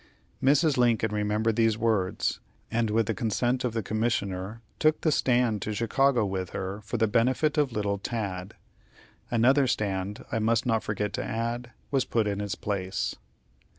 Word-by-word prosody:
Mrs. 145 +2 +4
Lincoln 115 -3 +3
remembered 105 +2 0
these 115 -2 +3
words, 110 -6 0 0.3
and, 115 -1 +1
with 110 +1 +2
the 115 - -1
consent 120 +3 0
of 125 -3 -1
the 115 -2 -1
Commissioner, 110 -1 -2 0.2
took 155 0 +3
the 155 - +2
stand 120 -6 +2
to 105 +2 -3
Chicago 120 +2 +2
with 95 -2 -3
her 95 +2 -4
for 110 +3 -4
the 110 0 +3
benefit 130 +8 +2
of 145 -4 +2
little 100 -2 -1
Tad. 95 -4 -4 0.7
Another 130 +4 +4
stand, 100 -2 -2
I 115 - 0
must 115 +2 +2
not 115 -2 +2
forget 105 -1 -2
to - - -2
add, 115 +2 -3 0.2
was 135 -3 +2
put 115 -2 +1
in 100 -1 -1
its 100 -2 -3
place. 95 -2 -2
110 Hz, 165 wpm, -27 LUFS, 105-120 Hz, 0.7 s, Mrs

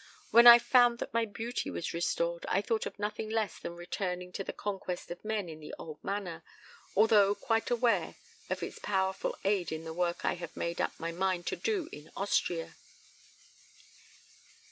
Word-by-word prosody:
When 235 +1 +8
I 235 0 +13
found 240 0 +4
that - - -6
my 230 0 +2
beauty 225 +3 -4
was - - -4
restored 170 0 -1
I 190 - +3
thought 225 0 0
of - - -9
nothing 210 +1 -3
less 220 -4 -1
than 170 - -6
returning 180 +1 -4
to 195 - -4
the - - -4
conquest 190 -4 -5
of 175 - -7
men 215 -3 -2
in 160 -1 -8
the 150 - -8
old 155 -2 -9
manner, 195 -4 -4 0.5
although 205 -1 +5
quite 225 +1 0
aware 240 -1 +1 0.3
of - - -2
its - - -6
powerful 190 -1 -1
aid 195 -4 +1
in 160 0 -4
the 160 0 -6
work 175 0 -1
I - - +2
have 170 -1 -8
made 170 0 -2
up - - -2
my 165 +1 -3
mind 180 0 -1
to - - 0
do 405 -8 -1
in 150 +1 -11
Austria. 175 -4 -1
190 Hz, 180 wpm, -31 LUFS, 170-220 Hz, 0.5 s, I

